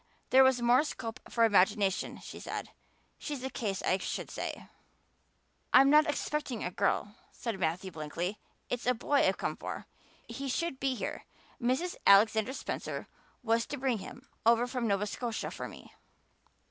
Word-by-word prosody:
'There 265 +1 +8
was 260 -2 +3
more 245 +4 +5
scope 255 -5 -5
for 230 - +2
imagination,' 205 -2 +3
she - - -9
said. - - -5 0.5
She's 290 -4 -5
a 265 - -3
case, 200 -6 -3
I 185 - +2
should - - -4
say." - - -5 1.1
"I'm 270 +2 +8
not 300 0 +6
expecting 290 -5 -2
a 180 - -2
girl," 200 +2 0 0.2
said 225 -5 -4
Matthew 180 +2 -1
blankly. 165 +5 -4 0.3
"It's 245 0 -3
a 250 - +4
boy 285 +5 +1
I've - - +1
come - - -2
for. - - -6 0.4
He 270 +4 -5
should 335 0 -1
be 270 -1 0
here. - - -5 0.4
Mrs. 260 +9 0
Alexander 220 +4 +6
Spencer - - -4 0.4
was 230 0 +2
to 290 - -4
bring 255 -4 0
him 255 +7 -10 0.2
over 235 +1 +5
from 245 -1 -2
Nova 200 0 +1
Scotia 230 +2 -3
for - - -5
me." - - -13
235 Hz, 160 wpm, -31 LUFS, 205-265 Hz, 1.1 s, There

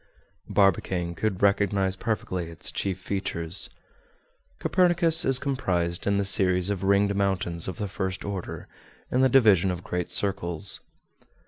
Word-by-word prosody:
Barbicane 90 -3 +1
could 95 +2 -2
recognize 100 -1 +2
perfectly 95 -5 -3
its 85 - -4
chief 95 -2 -2
features. 90 -2 -3 0.9
Copernicus 175 -3 +3
is 135 -1 +4
comprised 95 -12 -1
in 100 0 +2
the 100 - 0
series 95 -1 +2
of 95 -3 -3
ringed 100 +1 +3
mountains 95 -4 -1
of 95 - -5
the 105 -3 -3
first 95 0 -4
order, 100 -3 -6 0.4
in 125 - +2
the 130 - +4
division 105 -8 +4
of 90 -1 -4
great 90 -1 -3
circles. 95 -2 +1
95 Hz, 135 wpm, -26 LUFS, 90-100 Hz, 0.9 s, is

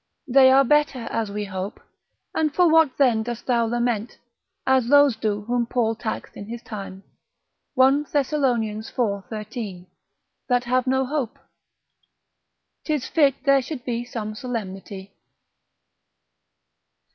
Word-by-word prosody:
They 260 0 +6
are 270 +1 +6
better 295 -1 +2
as 225 -2 -1
we 205 +1 -4
hope, 190 +1 -5 0.5
and 310 -1 +1
for 360 -1 +5
what 320 -4 +4
then 245 -6 +3
dost 240 +1 -5
thou 235 -2 +2
lament, 235 -1 -1 0.5
as 260 -2 +3
those 285 -2 +5
do 215 -2 -2
whom 240 +1 -1
Paul 235 -2 +1
taxed 225 -1 -5
in 200 - -8
his 235 +1 -7
time, 195 -2 -8 0.7
1 270 +3 +4
Thes. 285 -1 -1
iv. 220 -6 -1
13. 215 -4 -6 0.6
that 245 -1 +2
have 255 +1 0
no 265 +1 +2
hope? 275 -2 -3 1.5
'Tis 300 -4 -2
fit 285 -5 +3
there 275 -1 +4
should 255 -1 -7
be 240 -1 -2
some 225 -3 -5
solemnity. 200 -4 -6
240 Hz, 130 wpm, -23 LUFS, 215-265 Hz, 1.5 s, They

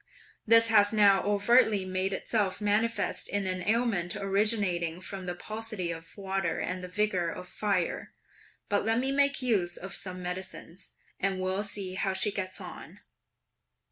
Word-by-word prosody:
This 230 +1 +7
has 205 -2 +5
now 205 -3 +5
overtly 205 0 +3
made 185 +1 -1
itself 200 0 -1
manifest 210 +1 0
in 205 -1 -1
an 185 -1 -2
ailment 220 -6 +1
originating 195 -4 +1
from 185 0 -6
the 175 - -2
paucity 215 -2 -4
of 165 +3 -9
water 195 -3 -1
and 180 0 -3
the - - -5
vigour 185 -2 0
of 180 - -7
fire; 195 -5 -1 0.6
but 205 - +1
let 225 +2 +1
me 265 +2 +1
make 280 -1 +2
use 195 -8 +1
of 190 +1 -7
some 185 -1 -5
medicines, 180 0 -6 0.3
and 190 0 0
we'll 185 +2 -1
see 200 -2 -3
how 190 +1 -1
she 195 +2 0
gets 185 -2 -4
on!" - - -10
195 Hz, 155 wpm, -29 LUFS, 185-215 Hz, 0.6 s, This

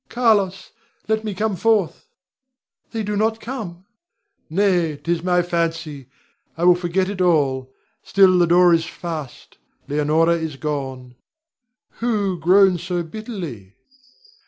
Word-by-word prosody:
Carlos! 210 -6 +1 0.4
let 220 0 0
me 210 -3 -4
come 210 +1 -1
forth! 210 -1 0 0.8
They 225 -2 -3
do 210 0 -3
not 220 +2 0
come! 210 -8 -7 0.6
Nay, 175 -4 +1
'tis 170 +2 -2
my 180 0 +2
fancy; 165 -5 -3 0.5
I 165 - -3
will 180 0 +7
forget 180 +1 -1
it 195 -1 -4
all. 135 -7 +1 0.3
Still, 190 -2 +4
the 175 - +4
door 175 +1 +5
is 165 -1 +2
fast; 160 -6 -8 0.3
Leonore 150 +3 +2
is 160 -3 -3
gone. 135 -4 -5 0.8
Who 205 -6 -1
groans 185 +1 +4
so 175 -1 -2
bitterly? 165 - -8
175 Hz, 125 wpm, -21 LUFS, 160-200 Hz, 0.8 s, will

